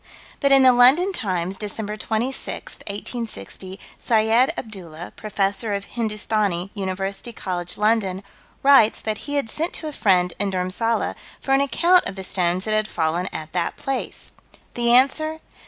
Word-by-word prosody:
But 280 -1 +2
in 270 -1 +7
the 255 -1 +7
London 265 +11 +6
Times, 185 - -2
Dec. 210 0 -5
26, 230 +5 -3
1860, 200 - -5 0.2
Syed 225 +4 +3
Abdoolah, 175 -6 -8
Professor 205 0 -1
of 200 0 -4
Hindustani, 210 -5 -1
University 195 +2 -4
College, 180 -5 -4
London, 210 -3 +1 0.4
writes 270 -6 +6
that 215 -1 -3
he 290 - -1
had 280 -5 0
sent 325 +3 -2
to 315 - -4
a - - -4
friend 180 -7 +2
in 205 - 0
Dhurmsalla, 190 +5 -1 0.3
for 270 - -4
an 270 - +4
account 345 +6 +3
of 195 - -8
the 190 - -6
stones 180 -1 0
that 215 - -1
had 215 0 +1
fallen 170 +1 -1
at 155 0 -6
that 175 -2 -1
place. 270 -1 -3 0.4
The 235 0 +1
answer 310 +6 +3
215 Hz, 155 wpm, -22 LUFS, 190-245 Hz, 0.4 s, in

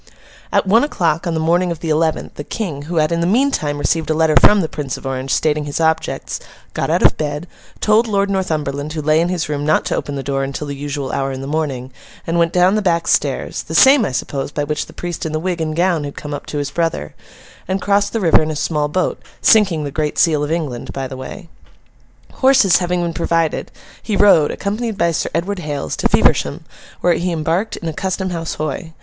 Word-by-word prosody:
At - - +2
one 220 +6 +4
o'clock 170 - 0
on 170 - -1
the - - 0
morning 175 +3 +2
of 165 - -4
the 165 - -2
eleventh, 160 +1 0
the 145 - -7
King, 160 -6 -4
who 175 - -3
had, 155 -1 +2
in 170 0 0
the 170 - +1
meantime, 200 - +1
received 160 +2 0
a 155 - +2
letter 160 -1 +3
from 210 -1 +6
the 160 - -1
Prince 145 -4 -4
of - - -12
Orange, 135 0 -3
stating 150 +1 +1
his 145 +1 -3
objects, 160 0 -1 0.3
got - - -2
out - - +2
of - - +5
bed, 150 +1 -3 0.4
told 220 +2 +3
Lord 200 -2 +1
Northumberland 155 -6 -2
who 155 - -3
lay 155 +2 +3
in 170 - 0
his 180 -3 -1
room 145 -1 -2
not 155 +1 +2
to - - -1
open 145 - -3
the 135 - -4
door 135 0 -1
until 140 +2 -4
the 140 -1 -5
usual 145 -1 -4
hour 135 0 -1
in 130 0 -5
the - - -5
morning, 135 -4 -3 0.3
and 170 +1 0
went 170 0 +2
down 180 +1 +4
the 215 - +1
back 170 -4 +1
stairs - - 0
(the - - -7
same, 270 -1 +7
I 170 - -1
suppose, 135 +2 -3
by 145 - -2
which 150 +1 -2
the - - -14
priest 175 -1 -5
in 160 - -3
the 155 - 0
wig 175 0 -2
and 155 -1 -2
gown 175 -2 +1
had 145 -1 -7
come 145 0 -6
up 145 - -6
to 150 - -4
his 145 -1 -2
brother) 165 - -2 0.5
and 190 +2 -1
crossed 200 +1 +1
the 225 - -1
river 170 -6 +5
in 155 - -1
a 155 - -3
small 150 0 0
boat: 180 +4 -1 0.2
sinking 195 -8 +4
the 145 - -4
great 150 +1 -2
seal 155 -3 +3
of 150 - -3
England 150 -8 -3
by 135 -1 -3
the 130 - -8
way. 130 +7 -8 0.9
Horses 260 -9 +5
having 180 -1 -1
been 170 -1 -2
provided, 165 0 0 0.3
he 215 - -2
rode, 195 -7 +5
accompanied 215 +2 -3
by 170 0 +2
Sir 165 - -1
Edward 185 +4 -1
Hales, 145 -4 -3
to - - +1
Feversham, - - +2 0.4
where 175 - +4
he 175 +2 -1
embarked 170 +6 -1
in 170 - -6
a 160 - -2
Custom 190 +2 -2
House 165 -2 -3
Hoy. 155 +2 -4
160 Hz, 235 wpm, -18 LUFS, 145-180 Hz, 0.9 s, same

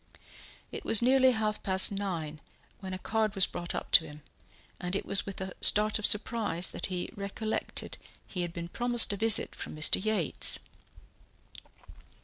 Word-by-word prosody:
It - - -8
was 225 +1 +2
nearly 260 +1 +4
half 215 -2 -3
past 190 -1 +4
nine 170 -7 -5 0.4
when 190 -1 -8
a 185 - -4
card 215 +1 -2
was 195 - +6
brought 175 0 -6
up - - -6
to 165 - +6
him, 150 0 -13 0.6
and 180 +1 -5
it - - -3
was 200 - +1
with 195 - -6
a 190 -1 -6
start 215 +1 +3
of 210 - +4
surprise 210 -5 +2
that - - -5
he 180 -2 -5
recollected 205 +2 -5 0.3
he 180 - -6
had 175 -1 -4
been 170 0 -7
promised 240 +3 +1
a - - -3
visit 225 +1 +2
from - - -8
Mr. 155 +4 +4
Yates. 215 -8 0
200 Hz, 165 wpm, -29 LUFS, 180-220 Hz, 0.6 s, was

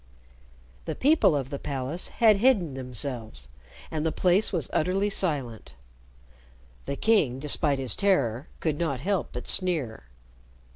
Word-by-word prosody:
The 160 - -4
people 290 - +3
of 135 -1 -3
the 140 - -4
palace 140 +4 -2
had 220 -3 +3
hidden 200 - +2
themselves, 125 - -4 0.4
and 155 -1 -2
the 160 - 0
place 185 +6 +2
was 165 - -2
utterly 195 +5 0
silent. 140 - 0 1.1
The 140 - -2
king, 155 - +2
despite 145 0 +1
his 130 -5 -2
terror, 145 - +1
could 155 -3 -1
not 150 -7 -1
help 195 +1 -1
but 125 - -7
sneer. 155 - -1
150 Hz, 135 wpm, -26 LUFS, 130-185 Hz, 1.1 s, people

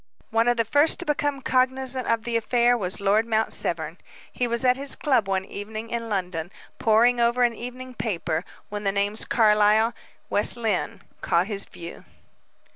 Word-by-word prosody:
One 225 +1 +2
of 240 0 +2
the 230 - +1
first 290 +8 +3
to 355 - -5
become 290 -2 -1
cognizant 260 0 +1
of 230 -1 0
the 235 -1 -3
affair 240 +2 +2
was 190 -5 -1
Lord 210 +3 +2
Mount 220 -1 0
Severn. 160 0 -2 0.3
He 245 - -1
was 235 +2 -1
at 250 0 +4
his 275 +1 +1
club 255 -8 +1
one 190 -1 -1
evening 215 +3 -7
in 230 -1 -3
London, 180 -4 -3 0.3
poring 235 +2 +3
over 235 +1 +2
an 240 -1 +2
evening 250 +2 -8
paper, 170 -8 -3 0.3
when 205 0 -5
the 195 - +1
names 200 +2 0
"Carlyle," 215 0 +3 0.3
"West 210 +3 +4
Lynne," 220 -6 -2 0.2
caught 170 +2 +1
his 200 -1 -3
view. 170 0 -10
225 Hz, 175 wpm, -24 LUFS, 200-245 Hz, 0.3 s, at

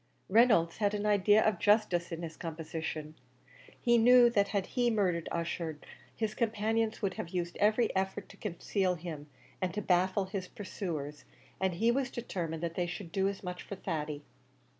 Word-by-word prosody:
Reynolds 215 -6 +4
had 210 -1 +1
an 205 0 -2
idea 210 +1 +4
of 210 -5 +2
justice 205 -6 +2
in 165 +1 -5
his 160 -1 -6
composition: 160 -2 -5 0.7
he 240 -1 +4
knew 240 +1 +7
that 200 -3 +3
had 200 -1 -1
he 245 -2 +2
murdered 185 -7 0
Ussher, 165 -2 -3 0.4
his 220 -1 -2
companions 225 0 0
would 195 -2 +1
have 170 - -5
used 175 -1 -3
every 215 +2 +2
effort 190 +1 -1
to - - -14
conceal 185 -1 -1
him, 155 -3 -7 0.3
and 185 -1 0
to 210 - -1
baffle 185 +2 +2
his 190 -1 -5
pursuers; 155 -8 -5 0.3
and 190 -2 0
he 230 +6 +3
was 260 0 0
determined 170 -10 -4
that 170 -1 -2
they 175 0 -1
should 175 0 -6
do 190 +2 +1
as 200 0 -4
much 180 -1 -5
for 200 - -7
Thady. 150 -5 -4
190 Hz, 175 wpm, -31 LUFS, 170-215 Hz, 0.7 s, knew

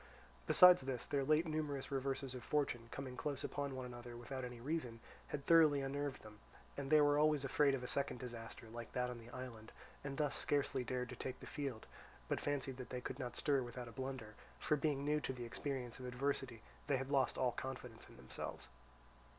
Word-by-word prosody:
Besides 180 -3 +10
this, 130 -3 -3
their 140 -1 +1
late 155 +4 +4
numerous 150 -3 -2
reverses 135 -1 -1
of 125 -2 -6
fortune, 120 -6 0
coming 130 -1 -5
close 140 0 -2
one 145 0 -2
upon 130 -1 -4
another 120 -1 -8
without 130 +2 -5
any 125 -1 -6
reason, 125 -3 -2 0.3
had 140 -2 -4
thoroughly 155 -4 +7
unnerved 140 0 -2
them, 105 -1 -12 0.4
and 140 -1 -4
they 155 0 +7
were 145 0 +5
always 150 -2 +4
afraid 140 0 +4
of 125 - -5
a - - -3
second 140 -2 -1
disaster 115 -1 -7
like 115 0 -7
that 125 0 0
on 120 - -6
the 115 0 -12
island, 120 -3 -7 0.3
and 140 -1 -4
thus 150 -2 +1
scarcely 140 -3 +1
dared 125 +1 -2
to - - -6
take 130 -1 -5
the - - -9
field, 135 -6 -4 0.4
but - - 0
fancied 140 -2 -1
that 125 - -7
they 125 - -3
could 130 +2 -5
not 125 -3 -4
stir 140 -3 +3
without 120 0 -5
a - - -8
blunder, 130 -4 -5 0.2
for 150 - +2
being 140 -1 0
new 150 +1 +3
to 130 - -2
the 120 -2 -5
experience 125 0 -3
of 125 - -5
adversity 125 -2 -2 0.2
they 140 -2 +3
had 135 +1 -4
lost 135 -2 +3
all 125 -1 +3
confidence 125 -3 -6
in - - -14
themselves. 65 +1 -6
130 Hz, 205 wpm, -39 LUFS, 125-145 Hz, 0.4 s, Besides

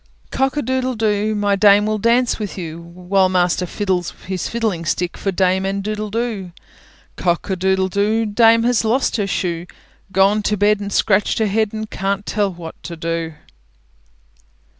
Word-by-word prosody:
Cock 270 +2 0
a 295 - 0
doodle 260 +1 -1
doo! 215 -1 0
My 205 -1 +1
dame 205 +1 +5
will 215 0 -1
dance 235 +3 +2
with 210 -2 -5
you, 165 -2 -6
While 180 +3 0
master 180 0 +1
fiddles 185 -3 -2
his 185 -1 -3
fiddling 220 -7 -1
stick, 175 +2 -2
For 195 - -2
dame 190 0 +1
and 195 +1 -2
doodle 215 0 -3
doo. 210 -5 -3 0.6
Cock 175 +2 -1
a - - +1
doodle 190 +1 +1
doo! 210 +4 +1
Dame 230 +2 +4
has 240 -2 +2
lost 235 +3 +1
her 205 -2 -1
shoe; 175 -3 -2 0.4
Gone 200 +2 +3
to 210 0 0
bed 205 +1 +3
and 200 0 -5
scratched 205 +1 +2
her 220 - +2
head, 215 +1 +1
And 220 0 -5
can't 200 0 -2
tell 205 -2 0
what 170 -2 -10
to 170 - -7
do. 165 -1 -3
200 Hz, 175 wpm, -19 LUFS, 185-215 Hz, 0.6 s, dame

